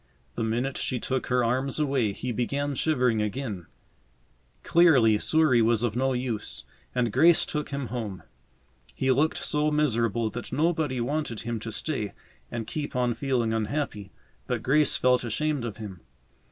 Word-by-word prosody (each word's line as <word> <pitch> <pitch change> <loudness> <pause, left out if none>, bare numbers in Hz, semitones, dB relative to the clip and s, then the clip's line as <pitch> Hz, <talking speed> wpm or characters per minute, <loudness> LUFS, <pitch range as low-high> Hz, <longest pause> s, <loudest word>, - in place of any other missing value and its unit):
The - - -4
minute 120 +4 -1
she 125 - -1
took 130 +1 -2
her 125 -1 +2
arms 130 +5 0
away 135 -8 +1
he 125 +5 -4
began 140 +5 -1
shivering 125 -6 +1
again. 105 -4 -4 1.0
Clearly 130 -11 +5
Souris 155 -5 +3
was 115 0 +2
of 115 -3 0
no 130 +1 +1
use, 125 -4 -3 0.3
and 120 -4 +1
Grace 170 0 +5
took 150 -1 -3
him 140 -4 -4
home. 110 -5 -5 0.7
He 130 0 +1
looked 150 +5 +2
so 150 0 +1
miserable 115 -7 +1
that 120 - -7
nobody 155 -2 0
wanted 125 -2 -2
him 115 -1 -3
to 115 +1 -6
stay 110 -6 -2 0.4
and 115 -2 -4
keep 145 +4 -5
on 125 -1 +1
feeling 120 -4 0
unhappy, 110 -3 -2 0.4
but 120 -3 -2
Grace 150 +3 +3
felt 125 0 +3
ashamed 140 +3 -1
of 110 -3 -5
him. 100 -5 -8
125 Hz, 155 wpm, -27 LUFS, 115-140 Hz, 1.0 s, Clearly